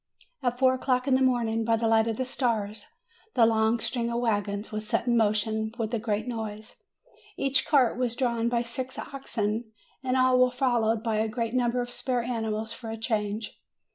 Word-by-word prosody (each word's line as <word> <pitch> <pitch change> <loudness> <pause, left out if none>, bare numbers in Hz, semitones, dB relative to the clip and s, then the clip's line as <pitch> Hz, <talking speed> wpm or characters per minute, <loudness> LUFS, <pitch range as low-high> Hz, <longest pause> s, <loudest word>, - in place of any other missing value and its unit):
At 245 -1 0
four 260 0 +4
o'clock 255 0 0
in 270 - +3
the 260 - +3
morning, 235 -3 +2
by 225 0 +2
the 225 0 0
light 225 0 +4
of 225 -1 -1
the 260 - -1
stars, 220 -5 -2 0.5
the 235 - +6
long 225 +1 +2
string 235 +1 -1
of 235 0 -1
wagons 205 -3 -1
was 215 0 -4
set 230 0 0
in 240 -1 +2
motion 220 0 +1
with 225 -1 -3
a 235 - +1
great 215 +1 -2
noise; 220 -2 -6 0.6
each 275 0 +2
cart 260 -5 +3
was 245 -2 0
drawn 235 -3 0
by 235 0 +1
six 255 +2 -5
oxen, 225 -4 -3 0.3
and 260 0 +1
all 255 0 +4
were 255 0 +5
followed 240 -3 +1
by 225 -2 0
a 220 +1 +1
great 230 0 -2
number 245 -1 +1
of 245 0 -5
spare 245 0 -1
animals 225 -2 -2
for 230 -1 -8
a 225 - -4
change. 215 -1 -2
230 Hz, 200 wpm, -27 LUFS, 220-250 Hz, 0.6 s, the